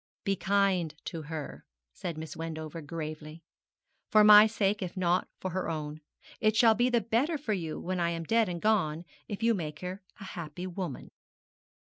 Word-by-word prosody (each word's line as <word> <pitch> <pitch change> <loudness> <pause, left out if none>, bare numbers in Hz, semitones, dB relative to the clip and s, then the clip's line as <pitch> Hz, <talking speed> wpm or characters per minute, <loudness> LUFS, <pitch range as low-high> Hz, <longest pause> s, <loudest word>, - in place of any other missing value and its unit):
'Be 195 - +1
kind 190 -4 +1
to 165 - -5
her,' 155 -1 -6 0.3
said 170 -3 -5
Miss 160 0 -6
Wendover, 160 0 -5
gravely, 155 +1 -7 0.7
'for 215 -1 +6
my 210 0 +10
sake, 210 -2 0
if 185 +1 -5
not 180 0 +2
for 185 - -4
her 185 +1 -2
own. 155 -1 -4 0.4
It 215 0 +2
shall 230 -1 +6
be 240 +3 +2
the 240 -2 +2
better 245 - +1
for 270 -7 -2
you 165 -5 -3
when 185 0 -3
I 170 -1 +2
am 165 -1 -3
dead 225 +3 +2
and 175 -1 -3
gone 175 -6 +1 0.2
if 205 +2 -5
you 230 0 +4
make 155 -6 -4
her 185 +2 -5 0.2
a - - -8
happy 175 -2 -6
woman.' 180 -6 -5
180 Hz, 185 wpm, -30 LUFS, 160-210 Hz, 0.7 s, my